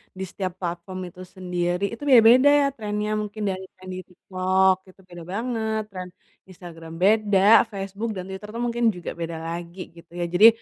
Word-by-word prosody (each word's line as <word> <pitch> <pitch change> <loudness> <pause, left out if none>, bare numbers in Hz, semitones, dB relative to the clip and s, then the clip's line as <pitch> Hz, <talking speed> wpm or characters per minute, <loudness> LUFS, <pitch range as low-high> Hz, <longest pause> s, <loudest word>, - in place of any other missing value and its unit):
di 190 - -5
setiap 185 -2 -4
platform 175 +1 -5
itu 180 - -18
sendiri 180 0 -2
itu 230 - -8
beda-beda 265 +4 +6
trend-nya 210 -2 -3
mungkin 210 0 -5
dari 185 0 -5 0.2
yang 185 - -10
di 185 - -5
TikTok 185 +1 +1
itu 185 - -19
beda 175 -1 -10
banget, 220 -1 -2
trend 185 -1 -7 0.4
Instagram 165 -3 -11
beda, 205 +1 +3 0.3
Facebook 200 +3 -4
dan 185 - -5
Twitter 190 +2 -8
tuh 235 - -3
mungkin 240 0 -2
juga 180 -3 -7
beda 165 -1 -5
lagi 170 +2 -7
gitu 170 0 -16
ya. 175 - 0
Jadi 200 +5 +8
190 Hz, 170 wpm, -24 LUFS, 175-215 Hz, 0.4 s, Jadi